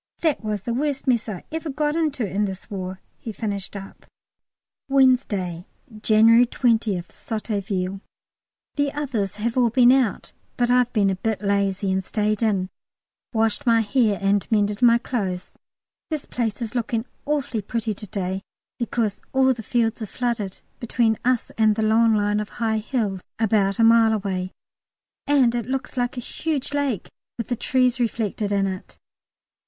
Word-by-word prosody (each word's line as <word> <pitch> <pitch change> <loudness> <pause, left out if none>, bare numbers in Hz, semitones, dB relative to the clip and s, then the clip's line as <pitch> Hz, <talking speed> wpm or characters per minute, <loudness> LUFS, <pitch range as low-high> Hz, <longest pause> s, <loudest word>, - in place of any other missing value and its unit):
That 310 -7 +1
was 210 -2 -2
the 235 - -2
worst 280 +2 -1
mess 235 -3 +1
ever 310 - -5
I - - -4
got 295 +1 0
into 300 -7 0
in 200 +2 0
this 190 0 -7
War," 185 -1 -5 0.2
he 225 - -6
finished 205 -2 -4
up. 195 -1 -10 0.8
Wednesday, 220 -10 +2 0.3
January 230 +2 +6
20th, 225 -8 +1
Sotteville. 195 -4 -3 0.8
The 285 -1 +1
others 240 -10 -2
have 230 +4 -1
all 240 -2 +4
been 245 +1 +6
out, 255 -6 +1 0.2
but 245 0 +2
I've 250 -1 +3
been 200 -4 +2
a - - -1
bit 220 +1 -2
lazy 200 -1 +1
and 190 0 0
stayed 210 +2 -1
in, 195 -5 +1 0.6
washed 225 +3 0
my 230 -1 +5
hair 215 -1 +2
and 200 +1 +1
mended 205 0 +1
my 235 -1 +6
clothes. 195 -7 -3 0.6
This 310 -3 -3
place 235 -1 -2
is 225 0 -5
looking 230 -1 -1 0.2
awfully 285 -6 -1
pretty 225 +1 -2
to 210 +1 -9
day, 190 -1 -3 0.4
because 230 -3 -1
all 265 0 +4
the 235 - -8
fields 230 +1 0
are 220 - -3
flooded 230 -5 -3 0.2
between 230 -2 +1
us 250 -1 +1
and 215 -1 +4
the 220 - 0
long 225 +1 +4
line 205 0 +1
of 210 0 -4
high 220 -2 +1
hills 210 -5 -2 0.2
about 205 -3 +2
a 230 - +3
mile 225 -1 +6
away, 190 -3 -2 0.8
and 270 -5 +4
it 240 -1 -2
looks 265 0 -3
like 245 0 -1
a - - -2
huge 290 +2 -3
lake 280 -9 -1 0.3
with 230 - -5
the 245 - +1
trees 255 0 +1
reflected 220 -3 -1
in 200 -1 +2
it. 190 -1 -6
225 Hz, 165 wpm, -23 LUFS, 200-245 Hz, 0.8 s, January